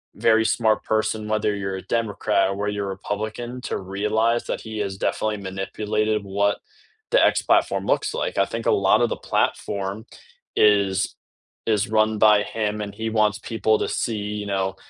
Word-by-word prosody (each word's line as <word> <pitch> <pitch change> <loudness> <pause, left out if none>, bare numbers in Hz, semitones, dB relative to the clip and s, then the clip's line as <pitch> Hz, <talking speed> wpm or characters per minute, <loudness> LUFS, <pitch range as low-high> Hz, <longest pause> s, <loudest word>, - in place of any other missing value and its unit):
very 110 0 +3
smart 110 -1 +2
person, 110 0 -1
whether 105 -1 0
you're 95 -1 -3
a - - -6
Democrat 105 -3 0
or 95 - -2
where 105 +1 -2
you're 100 -1 -3
Republican 110 +5 -4
to - - -3
realize 105 +5 0
that - - -3
he 110 -1 -7
has 100 -2 -3
definitely 105 +1 -1
manipulated 105 +2 -2
what 100 +1 0 0.5
the - - +5
X - - +3
platform - - +2
looks - - +1
like. - - -3
I 100 - +4
think 115 0 -5
a - - +5
lot 95 - +5
of 120 - +3
the - - -3
platform 100 +2 -2 0.5
is 100 -2 +3 0.5
is 105 -2 +1
run 110 0 +2
by 105 -1 +5
him 105 -1 -2
and 100 -1 -5
he 110 0 -3
wants 105 -2 +2
people 110 -1 0
to - - -1
see, 115 -2 -1 0.2
you 105 - -4
know, 95 -1 -1
105 Hz, 175 wpm, -23 LUFS, 100-110 Hz, 0.5 s, the